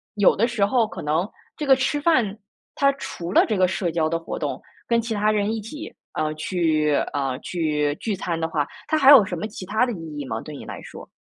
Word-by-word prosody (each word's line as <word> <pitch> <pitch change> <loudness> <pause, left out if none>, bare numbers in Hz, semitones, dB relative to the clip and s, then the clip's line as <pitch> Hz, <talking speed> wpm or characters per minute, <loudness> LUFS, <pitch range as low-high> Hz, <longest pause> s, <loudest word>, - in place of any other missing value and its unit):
有 205 -2 +5
的 230 +4 +2
时 235 -4 +1
候 225 +1 +2
可 - - -8
能 155 +5 0 0.3
这 300 - -3
个 270 -1 +6
吃 265 +3 0
饭 250 -11 +2 0.4
它 275 0 +4
除 175 -9 -6
了 - - +5
这 215 -4 0
个 185 -1 +4
社 180 -2 -1
交 160 -1 +1
的 165 0 -1
活 165 - -6
动， - - -3 0.3
跟 235 -1 +2
其 230 0 -3
他 210 0 +2
人 210 +1 0
一 220 - -3
起， 300 +9 -8 0.2
呃， 155 0 -1
去 155 -2 +1 0.2
呃， 135 -2 -1
去 150 -4 -1
聚 215 +3 -3
餐 170 -3 -3
的 160 - 0
话， 150 -3 -1 0.2
它 315 - +2
还 275 -1 +7
有 260 -8 +10
什 180 -3 -4
么 215 - -3
其 205 -3 -8
它 215 +6 +2
的 240 - -3
意 160 -4 -8
义 145 - -4
吗， 110 -3 -4
对 150 - -9
你 - - -9
来 - - -7
说？ - - -11
190 Hz, 260 characters per minute, -23 LUFS, 155-230 Hz, 0.4 s, 有